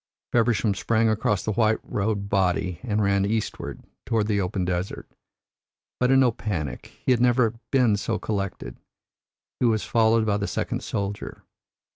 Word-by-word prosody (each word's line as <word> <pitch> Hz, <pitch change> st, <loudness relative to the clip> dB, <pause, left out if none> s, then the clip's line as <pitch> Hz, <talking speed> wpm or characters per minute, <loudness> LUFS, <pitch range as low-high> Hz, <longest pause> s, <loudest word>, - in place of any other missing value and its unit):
Feversham 115 Hz, -3 st, +2 dB
sprang 110 Hz, +3 st, +1 dB
across 105 Hz, -2 st, 0 dB
the 110 Hz, -, 0 dB
white 110 Hz, +1 st, +2 dB
robed 100 Hz, -1 st, -2 dB
body 90 Hz, -3 st, 0 dB
and 110 Hz, -4 st, 0 dB
ran 100 Hz, 0 st, +2 dB
eastward, 110 Hz, +2 st, -3 dB, 0.2 s
toward 110 Hz, -2 st, 0 dB
the 105 Hz, -2 st, +1 dB
open 90 Hz, 0 st, -2 dB
desert. 90 Hz, +1 st, -3 dB, 0.9 s
But 125 Hz, -, +2 dB
in 135 Hz, 0 st, +5 dB
no 125 Hz, -2 st, +4 dB
panic; 90 Hz, -, -4 dB
he -, -, +3 dB
had 120 Hz, -2 st, +3 dB
never 120 Hz, -2 st, +3 dB, 0.2 s
been 125 Hz, -6 st, +3 dB
so 110 Hz, +2 st, -1 dB
collected. 100 Hz, -, -4 dB, 0.8 s
He 125 Hz, -, +3 dB
was 110 Hz, -2 st, +1 dB
followed 115 Hz, -1 st, +3 dB
by 105 Hz, -2 st, +1 dB
the 100 Hz, 0 st, -2 dB
second -, -, -2 dB
soldier. 100 Hz, 0 st, -4 dB
105 Hz, 155 wpm, -25 LUFS, 100-115 Hz, 0.9 s, in